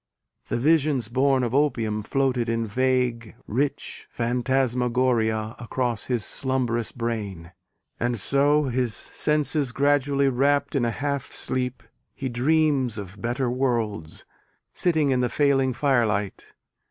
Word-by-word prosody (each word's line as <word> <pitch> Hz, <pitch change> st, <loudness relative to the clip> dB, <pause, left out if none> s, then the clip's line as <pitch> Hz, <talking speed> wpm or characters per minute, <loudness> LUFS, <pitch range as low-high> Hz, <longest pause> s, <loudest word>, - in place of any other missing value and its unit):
The -, -, 0 dB
visions 140 Hz, -3 st, +2 dB
born 130 Hz, +1 st, +2 dB
of 120 Hz, -1 st, -2 dB
opium 115 Hz, -7 st, +1 dB
floated 125 Hz, 0 st, 0 dB
in 115 Hz, 0 st, 0 dB
vague, 125 Hz, -1 st, 0 dB
rich 135 Hz, +6 st, -2 dB
phantasmagoria 120 Hz, -2 st, 0 dB
across 120 Hz, -2 st, -2 dB
his 120 Hz, -4 st, -1 dB
slumbrous 125 Hz, -4 st, -1 dB
brain, 105 Hz, -8 st, -4 dB, 0.5 s
And 120 Hz, 0 st, 0 dB
so, 140 Hz, +8 st, +3 dB
his 125 Hz, -4 st, -1 dB
senses 150 Hz, -2 st, 0 dB
gradually 140 Hz, 0 st, +2 dB
wrapt 140 Hz, +2 st, +1 dB
In 130 Hz, -4 st, +2 dB
a -, -, +1 dB
half 140 Hz, +2 st, -3 dB
sleep, 125 Hz, -2 st, -3 dB, 0.3 s
he 135 Hz, -, -4 dB
dreams 135 Hz, -1 st, +1 dB
of 100 Hz, 0 st, -8 dB
better 120 Hz, +1 st, -1 dB
worlds, 115 Hz, -10 st, -2 dB, 0.5 s
sitting 160 Hz, -5 st, +1 dB
in 130 Hz, -, +2 dB
the 125 Hz, -1 st, +1 dB
failing 135 Hz, -3 st, +2 dB
firelight. 115 Hz, -7 st, 0 dB
125 Hz, 120 wpm, -25 LUFS, 115-140 Hz, 0.5 s, so